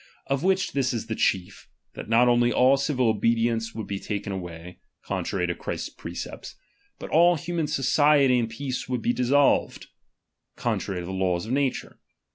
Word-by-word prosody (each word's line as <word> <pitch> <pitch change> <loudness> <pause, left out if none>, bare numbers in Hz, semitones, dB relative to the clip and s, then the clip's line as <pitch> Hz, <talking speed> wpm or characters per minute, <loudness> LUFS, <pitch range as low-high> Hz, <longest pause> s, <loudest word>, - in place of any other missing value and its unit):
Of 135 0 -1
which 190 +1 +1
this 130 -3 0
is 115 - -3
the 115 - -4
chief; 95 -1 -1 0.3
that - - -9
not 115 +2 +4
only 120 0 +3
aU 130 +3 +4
civil 135 -3 0
obedience 115 +1 0
would 110 -2 -4
be 100 0 -4
taken 100 -1 -4
away 90 -1 -8 0.3
(contrary 90 -2 -2
to 85 - -1
Christ's - - -5
precept); - - -8 0.4
but - - -9
all 175 +2 +5
human 165 0 -3
society 135 0 +3
and 115 -1 -1
peace 130 +2 -5
would 125 -3 -2
be 120 - +1
dissolved 135 +3 +2 0.7
(contrary 90 -2 -2
to - - -7
the 95 - -6
laws 95 -1 -1
of 110 - -6
nature). 135 0 -2
120 Hz, 170 wpm, -25 LUFS, 100-135 Hz, 0.7 s, all